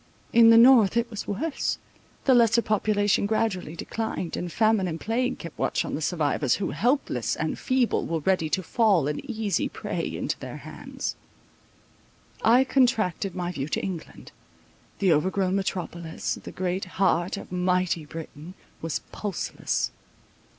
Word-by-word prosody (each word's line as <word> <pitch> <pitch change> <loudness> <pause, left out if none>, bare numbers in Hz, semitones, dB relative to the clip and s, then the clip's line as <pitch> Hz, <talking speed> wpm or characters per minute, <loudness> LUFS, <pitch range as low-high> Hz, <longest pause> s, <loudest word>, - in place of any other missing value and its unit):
In 230 -1 +8
the 230 - +8
north 235 -3 +7
it 235 0 0
was 215 - -6
worse—the 270 +2 -2
lesser 235 -1 +4
population 205 -1 +1
gradually 205 -7 -1
declined, 205 -2 -4
and 175 -1 -4
famine 215 -1 +2
and 165 -1 -4
plague 250 +4 -1
kept 170 -3 -9
watch - - 0
on - - -5
the 155 - -2
survivors, 150 -5 +1
who, 195 - -2
helpless 260 +5 0
and - - -3
feeble, 255 -3 +1
were 165 -1 -1
ready 175 -2 +1
to 185 - 0
fall 195 - +2
an 150 0 -2
easy 220 -4 -1
prey - - -4
into - - -2
their - - -7
hands. - - -6 1.3
I 240 +4 +6
contracted 225 - +1
my 175 -1 -2
view 140 -5 -4
to - - -2
England. 180 -5 -6 0.7
The 190 -4 +3
overgrown 185 +4 +1
metropolis, 175 -4 -3
the - - -8
great 185 +1 -2
heart 185 -1 +2
of - - -9
mighty 180 -2 +1
Britain, 160 +2 -9 0.3
was 165 -2 -2
pulseless. 205 -4 -2
195 Hz, 145 wpm, -26 LUFS, 170-225 Hz, 1.3 s, In